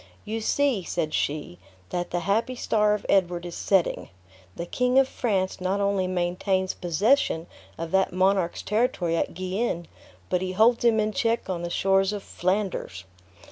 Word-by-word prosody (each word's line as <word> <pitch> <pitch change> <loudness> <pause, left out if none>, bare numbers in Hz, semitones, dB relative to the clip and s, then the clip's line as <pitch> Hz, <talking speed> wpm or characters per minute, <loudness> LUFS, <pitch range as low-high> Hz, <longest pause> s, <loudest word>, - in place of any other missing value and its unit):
"You 225 +2 -3
see," 270 -2 +1
said 160 -3 -2
she, 145 -10 -2 0.3
"that 175 0 -2
the 175 - -2
happy 225 +7 0
star 210 -3 +2
of 210 - -7
Edward 175 -3 +2
is 175 - -6
setting. 190 -1 0 0.5
The 170 - -4
King 250 +7 +1
of 270 -1 +6
France 195 -8 -1
not 190 +2 0
only 200 -2 +1
maintains 185 +1 0
possession 175 - +1 0.3
of 165 0 -5
that 190 0 +2
monarch's 185 -1 +1
territory 210 -6 0
at 165 - -1
Guienne, 185 -1 -2 0.4
but 180 - 0
he 185 0 -3
holds 230 +5 +4
him 230 -2 +4
in 215 0 +1
check 230 -4 0
on 175 -2 -3
the 175 - -3
shores 195 +2 +2
of 205 -1 -5
Flanders. 185 - -2
190 Hz, 165 wpm, -26 LUFS, 175-215 Hz, 0.5 s, of